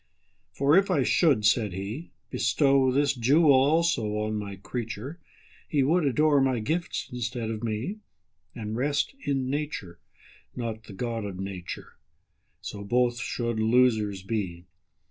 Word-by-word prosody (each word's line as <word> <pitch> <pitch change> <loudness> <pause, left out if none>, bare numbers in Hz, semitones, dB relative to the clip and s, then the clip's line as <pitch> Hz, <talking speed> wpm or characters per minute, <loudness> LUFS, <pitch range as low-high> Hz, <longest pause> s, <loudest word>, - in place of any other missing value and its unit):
For 140 +3 +3
if 195 +1 +4
I - - +2
should 140 - +3
(said 105 -1 +3
He)Bestow 130 - 0
this 140 +1 +2
jewel 140 +5 +4
also 135 -5 +2
on 105 0 -1
My 105 -2 -4
creature, 120 - -6 0.5
He 145 -4 +2
would 160 +4 +2
adore 145 +2 +3
My 130 -2 +2
gifts 160 +10 -2
instead 120 -2 -3
of 110 0 -5
Me, 115 - -3 0.6
And 110 -2 -4
rest 145 - 0
in 135 -2 0
Nature, 140 - -4 0.6
not 115 -3 -4
the 100 - -10
God 115 +2 -3
of 95 -3 -6
Nature:So 95 +2 -9
both 120 +3 +1
should 120 -2 -2
losers 110 -4 +2
be. 95 -5 -3
120 Hz, 130 wpm, -27 LUFS, 105-140 Hz, 0.6 s, if